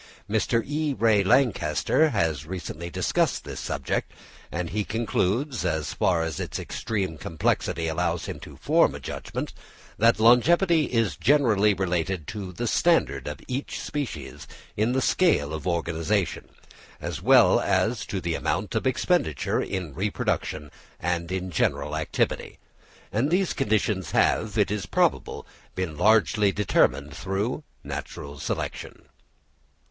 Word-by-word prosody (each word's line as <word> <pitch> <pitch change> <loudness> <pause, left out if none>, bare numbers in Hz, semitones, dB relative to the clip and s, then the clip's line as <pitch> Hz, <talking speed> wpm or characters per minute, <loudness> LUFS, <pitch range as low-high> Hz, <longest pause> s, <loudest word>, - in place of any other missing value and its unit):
Mr. 110 +2 +1
E. 150 0 -1
Ray 110 -3 +4
Lankester 120 - +3
has 80 - -1
recently 85 -2 -6
discussed - - 0
this - - -7
subject, 70 -1 -2 0.4
and 85 +1 -3
he 105 +1 0
concludes, 115 - -1
as 80 -4 -1
far 85 -3 +2
as 80 -2 -3
its - - -4
extreme 95 -8 -3
complexity 80 +1 -1
allows 80 -1 -1
him - - -6
to - - -11
form - - +3
a - - -6
judgment, - - -5 0.5
that 115 +1 +4
longevity 160 - +5
is 115 - 0
generally 105 - +3
related 90 -2 -1
to 100 +1 -6
the 120 +7 -4
standard 75 - +2
of 75 -1 -6
each 130 +3 -4
species 80 - -5 0.3
in 110 +4 +1
the 130 0 +1
scale 80 - +2
of 80 +2 -5
organisation, 85 +2 -1 0.5
as - - -5
well - - +6
as 105 +3 +1
to 100 - -4
the 85 -2 -2
amount - - -2
of - - 0
expenditure 75 -5 +1
in 90 -6 -4
reproduction 80 -5 -2 0.3
and 85 0 -2
in 95 0 -3
general 75 -1 0
activity. 80 0 -1 0.5
And 120 +7 +1
these 185 +2 +1
conditions 100 -4 0
have, - - +2
it 95 - +2
is 105 -2 -2
probable, - - 0 0.3
been 90 -4 -3
largely 105 +1 +4
determined 80 -7 +1
through 100 +9 -2 0.2
natural 70 -1 -7
selection. - - -4
95 Hz, 135 wpm, -26 LUFS, 80-115 Hz, 0.5 s, well